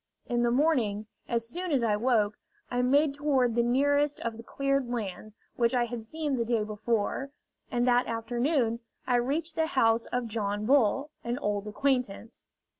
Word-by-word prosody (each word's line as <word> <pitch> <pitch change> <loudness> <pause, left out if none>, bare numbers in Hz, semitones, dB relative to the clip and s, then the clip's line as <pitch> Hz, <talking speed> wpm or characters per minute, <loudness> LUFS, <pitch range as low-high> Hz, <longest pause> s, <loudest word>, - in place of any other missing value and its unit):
In 240 -1 0
the 240 - +3
morning, 240 -6 +1 0.2
as 230 -1 0
soon 355 +7 -4
as 265 -5 +2
I 215 -2 +2
woke, 215 -2 +1 0.3
I 245 0 +1
made 280 +3 +3
toward 275 -4 +1
the 235 - +3
nearest 285 +4 +2
of 230 -1 -3
the 230 - -9
cleared 275 +1 -1
lands 215 -2 -5 0.2
which 235 +1 +2
I 240 -1 +3
had 240 0 -5
seen 290 +4 -3
the 235 - +1
day 230 -2 0
before; 215 +4 -1 0.4
and 245 0 0
that 245 0 +3
afternoon 235 +1 0 0.3
I 250 -1 +2
reached 300 +7 -1
the 320 0 0
house 230 -8 +2
of 250 -1 -2
John 210 -2 -2
Bull, 275 +3 +3
an 240 +1 -2
old 205 -5 -2
acquaintance. 250 -2 -2
240 Hz, 175 wpm, -29 LUFS, 225-275 Hz, 0.4 s, the